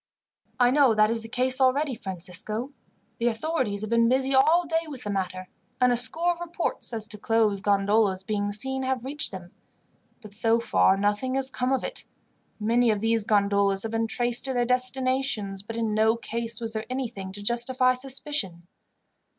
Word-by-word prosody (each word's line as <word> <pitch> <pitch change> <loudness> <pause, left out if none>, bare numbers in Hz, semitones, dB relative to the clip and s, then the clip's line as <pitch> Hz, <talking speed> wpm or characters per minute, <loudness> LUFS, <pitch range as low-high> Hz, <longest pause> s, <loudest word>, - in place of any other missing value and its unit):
"I 245 0 +5
know 270 -5 +4
that 215 +1 +4
is 230 -1 -2
the 225 - -10
case 255 +2 +2
already, 270 +2 +2
Francisco. 200 +5 -4 0.5
The 235 - +1
authorities 235 -3 -1
have 215 +1 -5
been 230 0 +3
busy 265 +1 +1
all 315 +7 +4
day 325 +1 -1
with 280 -5 -8
the 205 - -3
matter, 185 -1 -3 0.3
and 250 0 +4
a - - +3
score 325 +8 +1
of 345 - -6
reports 345 -5 -4
as 220 -2 -4
to 210 - -9
closed 215 -2 +1
gondolas 200 -1 +2
being 205 0 -2
seen 265 +6 -1
have 260 -2 -2
reached 290 +3 +2
them; 180 -2 -9 0.7
but 215 -4 -13
so 225 +2 +2
far 195 -4 +3
nothing 205 +6 0
has 270 0 +1
come 255 0 -1
of 265 - 0
it. - - -4 0.5
Many 235 +3 +2
of 210 -2 +1
these 225 0 0
gondolas 200 -2 +2
have 225 - -4
been 225 0 0
traced 240 +1 +1
to 265 - 0
their 245 -1 +1
destinations, 255 -5 0
but 225 +3 -8
in 225 -2 -1
no 220 +1 +3
case 230 -1 -3
was 225 -1 -3
there 220 0 -3
anything 230 -7 -4
to 205 +1 -8
justify 255 +3 +3
suspicion. 255 - -2
230 Hz, 185 wpm, -26 LUFS, 205-260 Hz, 0.7 s, I